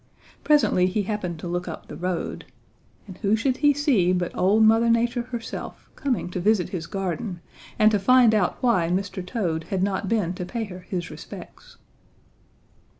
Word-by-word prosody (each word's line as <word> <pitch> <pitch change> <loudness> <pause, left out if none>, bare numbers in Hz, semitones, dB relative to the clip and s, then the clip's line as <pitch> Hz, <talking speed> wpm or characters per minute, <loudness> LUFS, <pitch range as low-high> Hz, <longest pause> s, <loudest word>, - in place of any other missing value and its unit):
Presently 290 -11 +4
he 200 +3 -1
happened 190 -5 -3
to 165 - -7
look 175 +1 -3
up 165 - -7
the - - -8
road, 180 -1 -3 0.6
and 190 -3 -11
who 210 0 +2
should 255 +3 0
he 290 0 +4
see 270 - +2
but 180 -1 -2
old 205 +4 +3
Mother 225 +2 +5
Nature 235 +1 +2
herself 240 -1 -7
coming 265 - -1
to 180 - -3
visit 200 -1 +2
his 165 -3 -5
garden 185 -1 -3 0.4
and 215 0 +5
to 210 - +2
find 245 +2 +5
out 200 -5 +1
why 185 -10 +2
Mr. 190 +1 -2
Toad 180 -5 -2
had 190 -1 -1
not 195 -1 -1
been 205 -6 0
to 180 - -5
pay 230 +5 -4
her 185 -4 -8
his 180 -1 -5
respects. - - -11
195 Hz, 175 wpm, -24 LUFS, 180-230 Hz, 0.6 s, Mother